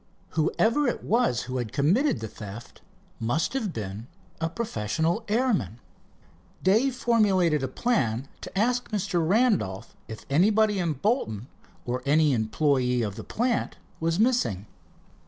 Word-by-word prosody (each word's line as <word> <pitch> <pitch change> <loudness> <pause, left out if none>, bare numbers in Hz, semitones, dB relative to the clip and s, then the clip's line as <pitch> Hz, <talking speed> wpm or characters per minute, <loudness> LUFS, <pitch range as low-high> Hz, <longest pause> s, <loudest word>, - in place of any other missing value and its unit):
Whoever 225 - +1
it 240 - -2
was 225 - +1
who 130 +1 -4
had 120 -4 -3
committed 205 - +2
the 110 - -4
theft 105 +2 -10 0.4
must 120 - 0
have 230 -8 -1
been 105 - -6 0.3
a 165 0 -1
professional 165 - -1
airman. 210 - 0 0.8
Dave 230 +8 +3
formulated 195 - +2
a 130 - -1
plan 130 - 0
to - - -8
ask 245 +4 +1
Mr. 200 -5 0
Randolph 175 - +1
if 110 -1 -9
anybody 205 +7 +3
in 170 -3 0
Bolton, 135 - -1 0.4
or 125 +1 -2
any 150 +1 +3
employee 125 +1 +1
of 100 -3 -3
the - - -7
plant 240 +1 -1 0.2
was 165 +2 0
missing. 215 - +1
165 Hz, 135 wpm, -26 LUFS, -, 0.8 s, Dave